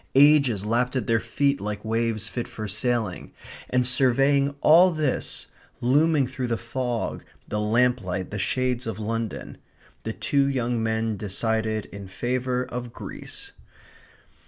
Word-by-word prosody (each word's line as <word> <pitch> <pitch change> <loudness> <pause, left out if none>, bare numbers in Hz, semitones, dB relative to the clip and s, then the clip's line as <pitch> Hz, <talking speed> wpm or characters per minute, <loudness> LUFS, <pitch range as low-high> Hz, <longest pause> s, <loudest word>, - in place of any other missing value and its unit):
Ages 140 -7 +5
lapped 125 +4 +1
at 130 - 0
their 115 -1 +2
feet 140 +3 0
like 105 +1 -4
waves 115 -1 -1
fit 120 +2 -4
for 110 -1 -6
sailing. 105 -1 -1 0.4
And 125 0 +2
surveying 135 +2 +3
all 175 +4 +7
this, 155 -6 -2 0.3
looming 145 +3 +3
through 130 0 -4
the 115 -1 0
fog, 120 0 -3 0.2
the 105 - -2
lamplight, 105 -4 +1
the 105 - -3
shades 125 +3 0
of 110 -4 -3
London, 115 0 -4 0.4
the 110 - -3
two 140 +3 +1
young 125 -3 0
men 110 -1 0
decided 110 +2 -1
in 100 -1 -9
favour 125 +5 -1
of 125 -1 -6
Greece. - - -8
120 Hz, 135 wpm, -25 LUFS, 110-130 Hz, 0.4 s, all